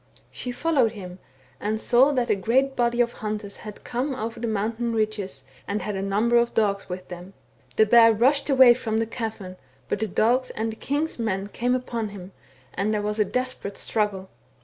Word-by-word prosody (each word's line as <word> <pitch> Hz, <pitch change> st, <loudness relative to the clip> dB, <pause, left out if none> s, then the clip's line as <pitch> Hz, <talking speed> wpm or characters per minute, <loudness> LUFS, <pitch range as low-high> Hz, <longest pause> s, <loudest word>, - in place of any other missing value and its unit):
She 250 Hz, -, -5 dB
followed 255 Hz, -4 st, +1 dB
him, 185 Hz, -3 st, -9 dB, 0.4 s
and 215 Hz, +1 st, -2 dB
saw 250 Hz, +5 st, +4 dB
that 250 Hz, -3 st, 0 dB
a -, -, +4 dB
great 260 Hz, +8 st, +1 dB
body 240 Hz, 0 st, +2 dB
of 240 Hz, 0 st, 0 dB
hunters 210 Hz, -1 st, -5 dB
had 210 Hz, -1 st, -10 dB
come 260 Hz, +3 st, -2 dB
over 225 Hz, 0 st, -5 dB
the 235 Hz, -, -2 dB
mountain 225 Hz, +2 st, -1 dB
ridges, 210 Hz, -10 st, -2 dB, 0.2 s
and 200 Hz, -1 st, -2 dB
had,J 205 Hz, -1 st, -3 dB
a -, -, -2 dB
number 210 Hz, +5 st, +2 dB
of 235 Hz, 0 st, +1 dB
dogs 200 Hz, -3 st, +1 dB
with 180 Hz, 0 st, -6 dB
them. 180 Hz, +2 st, -9 dB, 0.4 s
The 220 Hz, -, +5 dB
bear 230 Hz, +1 st, +7 dB
rushed 275 Hz, +6 st, +2 dB
away 260 Hz, -3 st, +8 dB
from 220 Hz, -2 st, -2 dB
the 225 Hz, -, +1 dB
cavern, 220 Hz, -5 st, -6 dB, 0.3 s
but -, -, -1 dB
the 220 Hz, -, -1 dB
dogs 245 Hz, +6 st, +2 dB
and 225 Hz, +1 st, -3 dB
the -, -, -8 dB
king's 290 Hz, 0 st, -2 dB
men 200 Hz, -3 st, -2 dB
came 245 Hz, +4 st, 0 dB
upon 235 Hz, -4 st, -3 dB
him, 195 Hz, -2 st, -10 dB, 0.4 s
and 200 Hz, +3 st, -1 dB
there 210 Hz, -1 st, -1 dB
was 210 Hz, +1 st, -2 dB
a 210 Hz, -, +4 dB
desperate 255 Hz, -3 st, -3 dB
struggle. 205 Hz, -3 st, -1 dB
220 Hz, 195 wpm, -25 LUFS, 205-240 Hz, 0.4 s, away